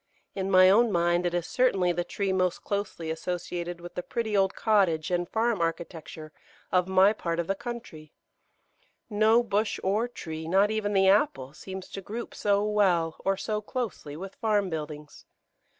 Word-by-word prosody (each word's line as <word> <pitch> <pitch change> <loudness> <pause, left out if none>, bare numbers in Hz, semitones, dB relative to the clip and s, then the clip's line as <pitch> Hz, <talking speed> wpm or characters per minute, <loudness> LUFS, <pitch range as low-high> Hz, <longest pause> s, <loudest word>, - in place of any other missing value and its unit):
In 195 0 -3
my 185 -1 +7
own 220 +4 +5
mind 175 0 +2
it 175 - -3
is 175 -2 -1
certainly 195 -8 +2
the 175 0 -1
tree 195 +2 -2
most 185 -1 0
closely 200 -5 -3
associated 175 +1 -4
with 175 0 -10
the - - -3
pretty 220 +2 -3
old 195 -1 +2
cottage 185 -7 +2
and 175 -1 0
farm 225 -3 0
architecture 165 -2 -4 0.4
of 180 -1 +2
my 190 +2 +5
part 170 -5 -3
of 170 - 0
the 195 - 0
country; 225 -9 -8 1.0
no 220 +3 +4
bush 210 -1 -1
or 210 +5 +1
tree, 160 -9 -7
not 195 +4 +3
even 210 -1 -1
the 195 -1 +4
apple, 190 - +2
seems 190 +3 -8
to 195 - -7
group 225 +5 -6
so 205 0 +1
well 185 -6 +2
or 195 0 0
so 210 +2 -2
closely 210 - -5
with 195 +3 -7
farm 205 -4 +1
buildings. 150 -1 -7
190 Hz, 170 wpm, -27 LUFS, 170-210 Hz, 1.0 s, my